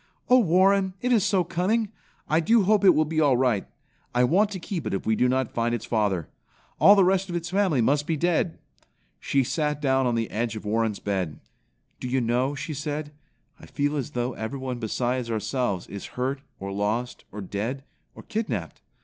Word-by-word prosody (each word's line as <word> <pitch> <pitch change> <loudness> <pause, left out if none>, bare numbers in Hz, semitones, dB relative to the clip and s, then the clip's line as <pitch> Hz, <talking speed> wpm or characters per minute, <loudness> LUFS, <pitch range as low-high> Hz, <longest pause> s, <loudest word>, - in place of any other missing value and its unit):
Oh, 255 - +8
Warren, 190 0 +3
it 250 +3 +1
is 220 - +4
so 200 -3 +2
cunning! 195 +6 0 0.4
I 155 - +3
do 220 +6 +4
hope 210 +2 +3
it 185 -2 +7
will 155 - +3
be 160 +1 0
all 140 -5 +4
right. 125 -6 +1 0.5
I 125 - +4
want 190 +12 +3
to 195 -2 -5
keep 170 -3 -4
it - - -1
if 95 - -4
we 110 - +2
do 125 +3 +2
not 130 -1 0
find 120 0 0
its 115 0 -6
father. 100 -8 0 0.5
All 200 - +8
the 195 - +5
rest 190 +1 +2
of 175 - -3
its 170 0 -3
family 185 -9 +2
must 145 +5 +1
be 165 -2 0
dead." 170 +1 0 0.6
She 135 -1 +1
sat 150 +1 -1
down 135 -2 +2
on 120 - +1
the 115 -1 -2
edge 115 0 -2
of 110 - -7
Warren's 110 0 0
bed. 95 -7 -3 0.6
"Do - - -5
you 130 +1 +1
know," 125 +4 0
she 145 +3 -5
said, 150 +1 -4 0.5
"I - - -13
feel 145 +1 -1
as 140 -5 -4
though 120 +1 -1
everyone 125 +2 -4
besides 120 +2 -1
ourselves 110 -3 -1
is 100 - -8
hurt 135 +2 -1 0.2
or 100 0 -5
lost 105 +5 -2
or 105 - -7
dead 110 +7 -4 0.3
or - - -11
kidnapped? 130 - -4
135 Hz, 200 wpm, -25 LUFS, 115-175 Hz, 0.6 s, Oh